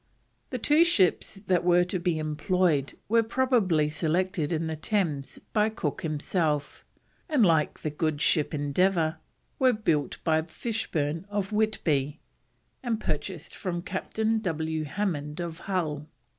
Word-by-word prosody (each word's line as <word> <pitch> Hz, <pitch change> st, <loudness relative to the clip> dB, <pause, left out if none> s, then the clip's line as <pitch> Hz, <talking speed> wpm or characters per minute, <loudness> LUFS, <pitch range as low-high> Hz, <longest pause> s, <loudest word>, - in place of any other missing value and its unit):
The 255 Hz, -, -3 dB
two 300 Hz, +7 st, +5 dB
ships 215 Hz, -, +2 dB
that 180 Hz, -2 st, +2 dB
were 175 Hz, 0 st, +5 dB
to 180 Hz, +1 st, -2 dB
be 170 Hz, -2 st, 0 dB
employed 155 Hz, -1 st, 0 dB
were 230 Hz, +2 st, +4 dB
probably 225 Hz, -, +2 dB
selected 170 Hz, 0 st, 0 dB
in 165 Hz, -1 st, 0 dB
the 160 Hz, 0 st, -2 dB
Thames 155 Hz, -5 st, -1 dB, 0.2 s
by 215 Hz, 0 st, +3 dB
Cook 190 Hz, -10 st, -3 dB
himself, 155 Hz, -1 st, -1 dB, 0.5 s
and, 280 Hz, -9 st, +4 dB
like 160 Hz, -4 st, +2 dB
the 155 Hz, -, -1 dB
good 155 Hz, 0 st, -1 dB
ship 150 Hz, 0 st, +2 dB
Endeavour, 160 Hz, +3 st, +1 dB, 0.4 s
were 260 Hz, -2 st, +5 dB
built 165 Hz, -10 st, 0 dB
by 160 Hz, -1 st, +3 dB
Fishburn 165 Hz, -3 st, -3 dB
of 205 Hz, -1 st, -2 dB
Whitby, 160 Hz, -10 st, 0 dB, 0.6 s
and 235 Hz, -4 st, -1 dB
purchased 165 Hz, -1 st, -4 dB
from 175 Hz, -3 st, -3 dB
Captain 220 Hz, +4 st, -1 dB
W. 160 Hz, -5 st, -2 dB
Hammond 150 Hz, -3 st, -3 dB
of 170 Hz, -1 st, -4 dB
Hull. 155 Hz, -6 st, -2 dB
170 Hz, 135 wpm, -27 LUFS, 155-205 Hz, 0.6 s, two